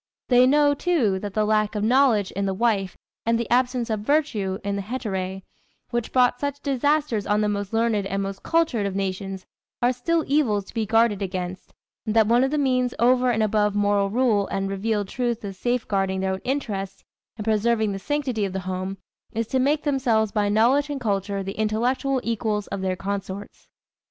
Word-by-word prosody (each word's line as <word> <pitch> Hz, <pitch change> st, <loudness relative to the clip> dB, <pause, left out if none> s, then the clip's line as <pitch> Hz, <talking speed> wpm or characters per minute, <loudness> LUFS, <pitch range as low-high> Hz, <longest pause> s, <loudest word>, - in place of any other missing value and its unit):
They 250 Hz, 0 st, +6 dB
know, 290 Hz, +1 st, +4 dB
too, 275 Hz, -, +1 dB
that 200 Hz, 0 st, -6 dB
the 215 Hz, -1 st, +2 dB
lack 215 Hz, 0 st, +1 dB
of 210 Hz, -, -1 dB
knowledge 235 Hz, -4 st, +3 dB
in 200 Hz, +1 st, -2 dB
the 190 Hz, -, -1 dB
wife 200 Hz, -4 st, 0 dB, 0.3 s
and 230 Hz, 0 st, +2 dB
the 235 Hz, -, -2 dB
absence 245 Hz, -1 st, +2 dB
of 215 Hz, -, 0 dB
virtue 215 Hz, -7 st, 0 dB
in 200 Hz, 0 st, -2 dB
the 200 Hz, -, -2 dB
hetæræ, 190 Hz, -4 st, -4 dB, 0.5 s
which 240 Hz, -1 st, -2 dB
brought 250 Hz, -1 st, +3 dB
such 285 Hz, 0 st, -3 dB
disasters 280 Hz, -5 st, 0 dB
on 210 Hz, +1 st, +2 dB
the 210 Hz, -, +1 dB
most 205 Hz, -1 st, -2 dB
learned 225 Hz, -3 st, +1 dB
and 195 Hz, +1 st, -2 dB
most 195 Hz, 0 st, -5 dB
cultured 315 Hz, -11 st, +1 dB
of 195 Hz, -, -4 dB
nations 195 Hz, 0 st, -3 dB, 0.3 s
are 245 Hz, +1 st, +2 dB
still 325 Hz, +6 st, 0 dB
evils 240 Hz, -9 st, +1 dB
to -, -, -14 dB
be 220 Hz, -2 st, -1 dB
guarded 225 Hz, -1 st, +3 dB
against, 185 Hz, -1 st, -4 dB, 0.4 s
and 215 Hz, -, -1 dB
that 220 Hz, -1 st, +6 dB
one 235 Hz, +4 st, +4 dB
of 265 Hz, -, +2 dB
the 300 Hz, -, -1 dB
means 255 Hz, -3 st, +1 dB
over 250 Hz, +1 st, +3 dB
and 220 Hz, -2 st, +1 dB
above 210 Hz, -1 st, +1 dB
moral 205 Hz, -1 st, +2 dB
rule 220 Hz, -3 st, +2 dB
and 195 Hz, 0 st, -2 dB
revealed 205 Hz, +1 st, -1 dB
truth 240 Hz, 0 st, -2 dB
of 195 Hz, -1 st, -6 dB
safe 245 Hz, +4 st, -1 dB
guarding 195 Hz, -2 st, 0 dB
their 190 Hz, 0 st, 0 dB
own 190 Hz, -, -5 dB
interests 200 Hz, -8 st, -3 dB, 0.3 s
and 210 Hz, -, -5 dB
preserving 220 Hz, 0 st, +2 dB
the 195 Hz, -, -4 dB
sanctity 265 Hz, -3 st, -1 dB
of 195 Hz, -2 st, -2 dB
the 190 Hz, -, -3 dB
home 185 Hz, +1 st, -4 dB, 0.4 s
is 230 Hz, +1 st, -1 dB
to 260 Hz, +4 st, -1 dB
make 290 Hz, +3 st, +1 dB
themselves 245 Hz, -7 st, +1 dB
by 205 Hz, -1 st, +1 dB
knowledge 250 Hz, +8 st, +3 dB
and 285 Hz, -1 st, -3 dB
culture 200 Hz, -3 st, -1 dB
the 195 Hz, +2 st, -6 dB
intellectual 245 Hz, +5 st, 0 dB
equals 220 Hz, -2 st, -1 dB
of 195 Hz, -, -4 dB
their 185 Hz, -1 st, -1 dB
consorts. 200 Hz, +1 st, -6 dB
215 Hz, 200 wpm, -24 LUFS, 195-250 Hz, 0.5 s, They